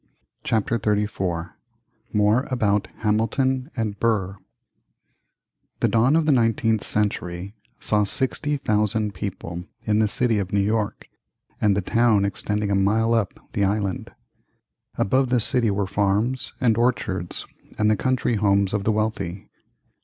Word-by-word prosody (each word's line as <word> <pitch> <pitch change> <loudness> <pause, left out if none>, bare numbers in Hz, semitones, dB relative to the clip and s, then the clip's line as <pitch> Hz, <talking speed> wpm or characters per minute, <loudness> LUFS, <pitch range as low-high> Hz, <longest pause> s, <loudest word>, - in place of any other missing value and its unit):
CHAPTER 115 +1 0
XXXIV 100 -5 -1 0.6
MORE 105 +5 +2
about 105 -5 +1
HAMILTON 125 +5 0
and 105 -3 -2
BURR 100 -4 0 1.4
The - - +3
dawn 120 +6 +3
of 165 -1 +3
the 155 - +3
nineteenth 115 -3 +2
century 100 -2 -2 0.3
saw 105 -1 +3
60,000 110 -4 0
people 90 -2 -6 0.2
in 105 -1 +1
the 110 - +3
city 115 0 +1
of 95 -2 -3
New 100 - +2
York 105 +1 -1 0.5
and 100 -2 +3
the - - +1
town 115 -2 +3
extending 105 +1 -2
a - - +2
mile 110 +4 +2
up 115 -5 0
the 100 - +1
island. 100 -1 -1 0.8
Above 130 +5 +1
the 125 -1 +3
city 115 0 +1
were 100 0 0
farms 105 +6 0
and 115 -4 +2
orchards 100 -7 -1 0.3
and 105 0 +3
the - - +3
country 130 -1 0
homes 100 -1 +2
of 100 -2 -1
the 110 - +3
wealthy. 105 -4 -3
105 Hz, 135 wpm, -23 LUFS, 100-115 Hz, 1.4 s, The